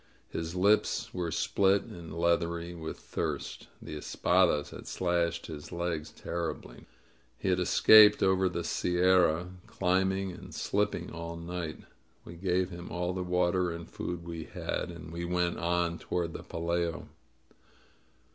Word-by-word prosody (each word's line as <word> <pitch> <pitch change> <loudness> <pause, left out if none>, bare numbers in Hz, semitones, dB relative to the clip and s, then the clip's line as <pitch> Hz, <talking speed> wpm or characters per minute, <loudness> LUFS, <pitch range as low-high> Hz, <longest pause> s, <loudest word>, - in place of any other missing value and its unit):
His 80 +1 -4
lips 100 +4 +2
were 85 -2 -2
split 100 +4 +2
and 85 -2 -10
leathery 85 0 0
with 80 -2 -6
thirst. - - -4
The - - -7
espadas 85 -2 +2
had - - -10
slashed 85 -2 0
his 75 -2 -8
legs 85 -3 -2
terribly. 85 +1 -5 0.5
He 95 - -2
had 90 0 +2
escaped 105 +4 +7
over 95 0 +3
the 85 -1 -3
Sierra, 90 -1 +3 0.2
climbing 95 +1 +1
and 90 - -10
slipping 105 +1 -1
all 85 0 -6
night. 85 -1 -5 0.4
We 85 - -9
gave 90 +1 0
him 85 0 -8
all 90 +1 -1
the 95 - -3
water 90 0 +1
and 85 0 -6
food 85 -1 -5
we 85 -2 -6
had, - - -3
and 85 -1 -9
he 85 - -3
went 90 0 0
on 85 0 0
toward 85 -2 -2
the - - -6
Pelayo. 85 0 -2
85 Hz, 140 wpm, -30 LUFS, 85-90 Hz, 0.5 s, escaped